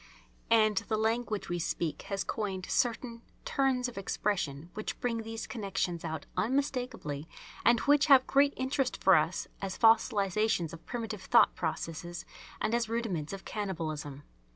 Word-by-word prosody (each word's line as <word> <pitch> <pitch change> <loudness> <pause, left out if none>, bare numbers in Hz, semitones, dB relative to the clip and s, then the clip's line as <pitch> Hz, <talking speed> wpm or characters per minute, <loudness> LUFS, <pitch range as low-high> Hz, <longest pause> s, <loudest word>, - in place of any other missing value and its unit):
And 215 -2 +4
the 215 +2 0
language 220 -1 -1
we 175 0 -2
speak 165 -1 -2
has 195 -1 -1
coined 195 -4 -3
certain 235 -1 0 0.2
turns 260 -2 +1
of 235 -5 -6
expression 175 -6 -2
which 215 - -5
bring 230 -2 -1
these 225 0 -5
connections 195 -6 -3
out 160 -1 -4
unmistakably 245 - -2 0.3
and 235 +1 +5
which 290 +1 +4
have 270 -3 +7
great 280 +1 +3
interest 260 0 0
for 190 - +7
us 160 +3 +1
as 195 -1 -4
fossilisations 215 -5 +3
of 165 - -11
primitive 225 -4 -4
thought - - +5
processes 165 +1 -4 0.3
and 220 - 0
as 235 -2 +1
rudiments 220 -10 -2
of 195 -1 -7
cannibalism. 155 -8 -4
215 Hz, 145 wpm, -31 LUFS, 175-235 Hz, 0.3 s, have